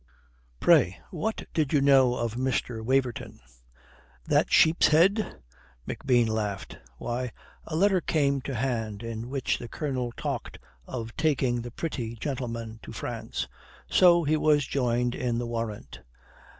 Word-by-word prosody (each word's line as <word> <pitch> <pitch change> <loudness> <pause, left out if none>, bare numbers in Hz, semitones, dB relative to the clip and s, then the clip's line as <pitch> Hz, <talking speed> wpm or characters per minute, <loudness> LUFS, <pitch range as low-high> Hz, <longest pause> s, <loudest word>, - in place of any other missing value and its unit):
"Pray, 90 +1 +4
what 185 +6 -3
did 155 -4 +1
you 145 - +5
know 135 -3 +5
of 115 -2 -2
Mr. 125 -2 -2
Waverton?" 130 0 -1 0.9
"That - - +2
sheep's 160 +2 +5
head!" 190 +8 +3 0.5
McBean 120 -3 +2
laughed. 105 -3 -3 0.2
"Why, 120 0 -3 0.3
a 155 - -5
letter 190 +1 +3
came 140 -4 +1
to 135 0 -5
hand 115 -3 -2
in 115 +1 -5
which 135 -1 -1
the 120 - -7
Colonel 130 -4 -3
talked - - -4 0.3
of 115 -3 -6
taking 135 -6 +1
the 120 - -6
pretty 120 -4 -4
gentleman 115 -3 -4
to - - -10
France. - - -4 0.4
So 175 -2 +6
he 155 +1 +2
was 150 -2 +3
joined 125 -2 0
in 120 -2 -1
the 120 - -2
warrant. 115 -3 -5
125 Hz, 135 wpm, -27 LUFS, 115-150 Hz, 0.9 s, So